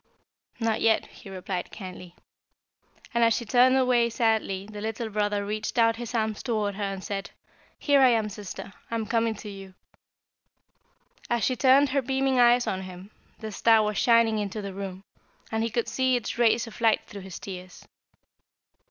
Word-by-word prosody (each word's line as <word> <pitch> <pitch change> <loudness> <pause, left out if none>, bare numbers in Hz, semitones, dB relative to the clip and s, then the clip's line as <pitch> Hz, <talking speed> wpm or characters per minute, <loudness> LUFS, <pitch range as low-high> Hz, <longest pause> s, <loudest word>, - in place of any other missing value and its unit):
"'Not 225 -2 0
yet,' 225 -1 +3
he 195 - -14
replied 185 -1 -5
kindly, 180 -3 -10 1.0
and 235 0 +3
as 230 -1 +4
she 235 - -3
turned 250 +3 +4 0.4
sadly 220 -4 0
away - - -13
the 210 0 -9
little 220 +1 -3
brother 205 -1 -1
reached 215 +3 -4
out 230 -1 +4
his 240 0 -6
arms 220 -2 -1
toward 215 -4 -1
her, 200 - -7
and 195 -1 -4
said, 195 -1 -4 0.5
'Here 285 -2 +3
I 260 - +7
am 225 -3 +2
sister; 200 -1 -8 0.2
I 230 - -3
am 225 -1 -2
coming 230 0 0
to 210 - -10
you.' 195 -2 -10 1.5
"As 235 -1 0
she 255 - +1
turned 270 +3 +5
her 275 +1 +1
beaming 265 0 0
eyes 240 0 +5
on 190 - -2
him, 185 +2 -10 0.3
the 220 -1 -7
star 220 +1 +4
was 210 -1 -1
shining 230 -2 +4
into 205 0 -3
the 200 -2 -6
room, 195 -1 -7 0.5
and 220 0 0
he 230 - 0
could 235 +1 -1
see 260 -1 +1
its 240 - -3
rays 235 0 +3
of 230 0 -12
light 225 -2 +3
through 200 - -9
his 190 -2 -8
tears. 185 -2 -9
220 Hz, 180 wpm, -26 LUFS, 200-235 Hz, 1.5 s, I